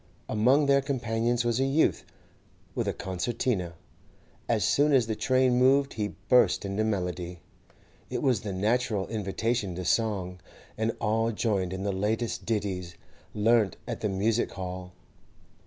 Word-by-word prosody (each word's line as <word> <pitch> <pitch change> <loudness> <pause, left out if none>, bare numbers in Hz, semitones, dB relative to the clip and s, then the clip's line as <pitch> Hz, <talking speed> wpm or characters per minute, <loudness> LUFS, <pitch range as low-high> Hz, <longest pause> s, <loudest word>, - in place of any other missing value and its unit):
Among 125 +7 +3
their 140 0 +4
companions 120 -3 -1
was 120 +1 +1
a - - +3
youth 135 +4 +2 0.7
with - - -2
a - - +2
concertina; 95 -1 -2 0.7
as - - +2
soon 145 +1 +3
as 130 -4 +4
the 110 0 -2
train 130 +1 +2
moved 135 +2 +4
he 105 -2 -3
burst 125 -5 +4
into 100 +2 -1
melody. 90 -4 -3 0.7
It - - -3
was 130 -6 +2
the 105 - -4
natural 105 +1 0
invitation 110 -1 -2
to 90 0 -5
song, 95 -3 0 0.4
and 110 +1 -1
all 115 +1 +1
joined 100 -5 -1
in 95 +1 -4
the 100 - 0
latest 110 +5 -2
ditties 95 -6 -2 0.4
learnt 110 -1 +3
at 120 -3 -4
the 105 - 0
music 105 +4 +1
hall. 90 -1 -6
110 Hz, 145 wpm, -28 LUFS, 95-120 Hz, 0.7 s, their